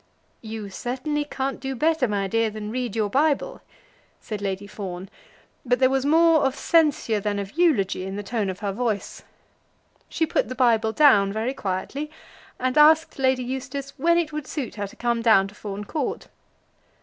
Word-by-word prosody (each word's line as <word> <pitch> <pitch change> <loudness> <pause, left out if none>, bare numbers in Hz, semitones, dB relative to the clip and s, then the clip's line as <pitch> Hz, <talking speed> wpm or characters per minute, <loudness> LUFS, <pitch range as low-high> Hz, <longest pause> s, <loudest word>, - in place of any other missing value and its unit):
"You 220 -3 -7
certainly 280 +8 -2
can't 270 -1 -3
do 270 0 -4
better, 315 0 +2
my 200 -2 -1
dear, 225 +3 +1
than 215 0 -6
read 245 -3 -3
your 215 -2 +1
Bible," 300 - 0 0.6
said 210 -2 -6
Lady 195 0 -3
Fawn, 190 -2 -7 0.5
but 245 -2 +2
there 260 0 +3
was 270 +1 +1
more 325 +1 +5
of 270 -1 +1
censure 300 -9 +2
than 205 0 -2
of 200 -1 -4
eulogy 215 - +1
in 195 - -5
the 205 - -4
tone 210 -1 -2
of 185 -1 -6
her 200 -2 -1
voice. 220 -1 -3 0.9
She 325 - 0
put 270 - 0
the 255 - -5
Bible 230 -3 +3
down 215 -8 +5
very 220 +5 -2
quietly, 270 +7 -4 0.5
and 255 +3 +1
asked 315 0 +5
Lady 260 -1 +2
Eustace 265 +2 -5
when 340 +4 +3
it 320 -3 -1
would 300 -2 -5
suit 270 -8 -4
her 205 -2 -4
to - - -15
come 235 -1 -1
down 220 -4 +5
to - - -16
Fawn 205 -1 -6
Court. 310 - -4
245 Hz, 180 wpm, -24 LUFS, 205-280 Hz, 0.9 s, more